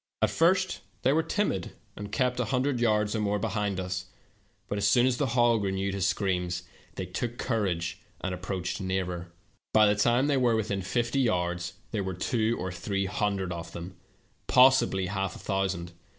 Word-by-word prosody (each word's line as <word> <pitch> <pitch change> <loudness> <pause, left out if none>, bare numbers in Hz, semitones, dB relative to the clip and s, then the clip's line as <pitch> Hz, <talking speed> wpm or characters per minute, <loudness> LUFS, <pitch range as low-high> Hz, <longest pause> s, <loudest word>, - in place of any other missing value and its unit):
At - - +3
first 185 +3 +2 0.2
they 130 - +4
were 160 - +3
timid, 160 - -1 0.2
and 105 0 -7
kept 125 +2 +1
a 125 - +1
hundred 130 +1 0
yards 105 -2 +2
or - - 0
more 105 -1 +1
behind 105 -2 -1
us, 90 0 -3 0.6
but 100 - -2
as 120 +5 +3
the 145 - +1
hog 120 -3 +3
renewed 95 0 -1
his 95 -1 +1
scream, 90 -4 0 0.5
they - - -3
took 120 0 -4
courage, 90 -7 -1 0.2
and 95 - -3
approached 90 0 -3
nearer. 90 -2 -2 0.2
" - - -43
By 110 -1 +7
the 105 0 +4
time 120 +5 +3
they 145 -1 +2
were 120 -3 +3
within 100 -3 -1
fifty 120 +7 0
yards 90 -6 0 0.2
there 105 -3 -1
were 95 -1 -3
two 110 +4 0
or 95 +1 -3
three 95 +2 -2
hundred 100 -2 -1
of 85 0 -7
them 85 +2 -7 0.3
— - - -39
possibl}^ 125 -7 +5
half 95 0 -2
a - - -10
thousand. 95 -3 -2
100 Hz, 180 wpm, -28 LUFS, 95-120 Hz, 0.6 s, By